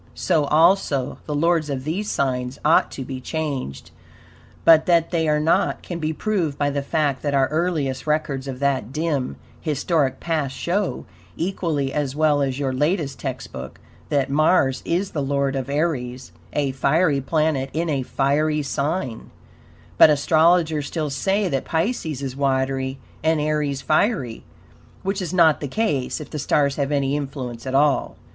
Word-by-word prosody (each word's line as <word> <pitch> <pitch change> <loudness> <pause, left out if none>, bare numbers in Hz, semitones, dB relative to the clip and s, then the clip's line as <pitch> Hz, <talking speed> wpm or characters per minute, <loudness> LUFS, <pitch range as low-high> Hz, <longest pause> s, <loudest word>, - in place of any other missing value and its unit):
So, 160 -5 +1
also, 155 -4 +2
the 150 - -2
lords 165 0 +2
of 135 -2 -3
these 190 +8 -2
signs 125 -1 -1
ought 155 - +4
to 135 - -6
be 130 -1 -6
changed, 140 - -4 0.7
but 160 -1 +7
that 170 -2 +3
they 165 -3 +1
are 150 0 +3
not 155 +2 +1
can 175 -2 -5
be 155 -1 -1
proved 165 -4 -1
by 145 -1 +1
the 140 0 -1
fact 140 -2 0
that 145 -1 -1
our 135 -1 +3
earliest 155 -5 -1
records 150 -3 -1
of 130 -2 -5
that 135 -5 0
dim, 150 -3 -1 0.2
historic 145 -3 0
past 150 -5 -2
show, 195 +3 -1 0.3
equally 160 -6 -1
as 145 -2 -2
well 150 -1 +3
as 135 -2 -1
your 135 -2 -1
latest 150 +1 0
"text 130 -3 -5
book," - - -8 0.3
that 140 -3 +1
Mars 145 -2 +3
is 185 +4 -1
the 150 - -2
lord 140 0 0
of 135 0 -3
Aries 130 - -2 0.2
a 145 -2 0
fiery 140 +3 +2
planet 150 -2 0
in 165 +2 -1
a 140 -4 0
fiery 150 +4 +1
sign; 140 -3 -3 0.7
but - - +9
astrologers 155 0 +3
still 155 -3 -3
say 195 +8 0
that 135 -6 -1
Pisces 160 - -2
is 130 -2 -4
watery 135 -1 0 0.3
and 160 0 +2
Aries 150 -2 -1
fiery, 155 - 0 0.6
WHICH 195 +1 -1
IS 175 -3 -3
NOT 165 -4 +4
THE 145 - -2
CASE, 140 - -1
IF 150 - -9
THE 150 - -4
STARS 140 0 +1
HAVE 140 -1 -1
ANY 140 -1 +1
INFLUENCE 130 -4 -5
AT 130 - -2
ALL. 145 0 +2
145 Hz, 165 wpm, -22 LUFS, 135-160 Hz, 0.7 s, but